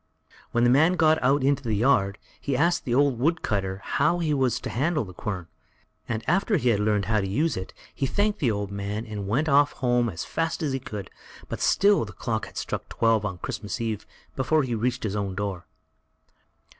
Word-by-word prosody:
When 120 - +2
the 120 - +5
man 160 +7 +5
got 160 -2 +3
out 135 +2 +3
into 140 +1 +2
the 115 -5 -1
yard, 100 -4 +2 0.2
he 140 -3 -1
asked 170 +3 +2
the 120 - 0
old 140 -3 +3
woodcutter 105 - 0
how 175 - +2
he 160 -3 0
was 130 -4 +1
to - - -5
handle 150 +3 0
the 90 - -10
quern; 95 -1 -4 0.6
and 110 -1 -2
after 195 +4 +2
he 125 -5 +1
had 105 -4 +2
learned 105 -1 +1
how 110 +1 +1
to 95 - -2
use 150 +11 0
it, 95 0 -5 0.2
he 135 - -1
thanked 205 +7 0
the 130 - +2
old 100 -2 -2
man 100 +2 -4
and 105 -3 -5
went 135 +10 +1
off 145 0 +4
home 120 -2 +1
as 85 - -5
fast 165 +1 -2
as 145 -3 0
he 135 - -1
could, 105 -6 -7 0.4
but - - -5
still 200 0 +4
the - - -8
clock 110 -2 -3
had - - -13
struck - - -4
twelve 115 -2 +2
on 100 -3 -3
Christmas 105 +6 -5
eve 110 -3 -3 0.3
before 140 +4 +2
he 125 -2 -2
reached 125 +3 -1
his 105 -2 -2
own 100 -2 -2
door. 100 -3 -4
120 Hz, 210 wpm, -26 LUFS, 105-145 Hz, 0.6 s, the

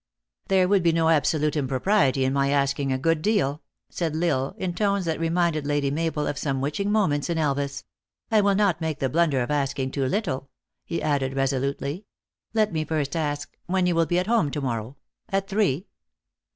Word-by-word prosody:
" - - -63
There 190 -1 +3
would 195 0 +3
be 170 -1 +3
no 165 0 +2
absolute 150 -1 +2
impropriety 135 0 +2
in 130 - +1
my 140 0 +2
asking 140 -1 +1
a 130 - +1
good 165 +3 +1
deal," 160 -8 +1 0.3
said 165 -3 -2
L 160 - -1
Isle, 135 -5 0
in 180 -2 -2
tones 200 0 0
that 160 -1 -1
remind 170 0 +1
ed 150 -2 -3
Lady 145 -1 +1
Mabel 155 0 -1
of 140 - -2
some 135 -3 -1
witching 150 +9 -1
moments 175 -9 +1
in 170 - 0
Elvas, 140 -2 -1 0.2
" - - -52
I 215 -1 +5
will 200 -1 +3
not 195 -5 +2
make 160 -2 -2
the 135 - -1
blunder 150 -3 +2
of 120 - -4
asking 135 -2 -1
too 135 -2 -1
little," 140 -7 -2 0.4
he 170 - -3
added 140 -3 0
resolutely. 140 +6 -1 0.2
" - - -56
Let 215 -3 +2
me 155 -1 0
first 150 -2 -2
ask 145 -3 -3
when 185 0 +1
you 180 - +2
will 165 -1 +2
be 175 - +1
at 180 - +1
home 220 -8 +2
to 145 +1 -4
morrow 120 0 -3 0.3
at 195 -1 0
three?" 195 -5 +1
155 Hz, 210 wpm, -25 LUFS, 140-180 Hz, 0.4 s, I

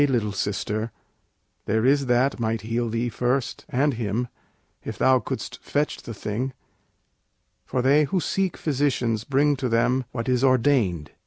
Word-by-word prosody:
little 115 -6 0
sister, 105 +2 -2 0.8
there 110 +3 +1
is 140 0 +3
that 125 +2 +2
might 115 -1 -1
heal 115 +1 -1
Thee 115 +2 -1
first, 125 +2 -1
and 140 +3 +2
him, 115 +1 -2 0.5
if - - -6
thou 130 -1 +4
couldst - - -5
fetch 150 +1 -1
the 115 - -7
thing; 115 +7 -3 1.1
For 125 - -1
they 145 +3 +5
who 185 +6 0
seek 190 +3 -1
physicians 130 -7 0
bring 145 +2 +2
to 130 -1 -1
them 125 +3 +2
What 115 -1 -4
is 125 0 +2
ordained. 120 - +2
125 Hz, 150 wpm, -24 LUFS, 115-135 Hz, 1.1 s, they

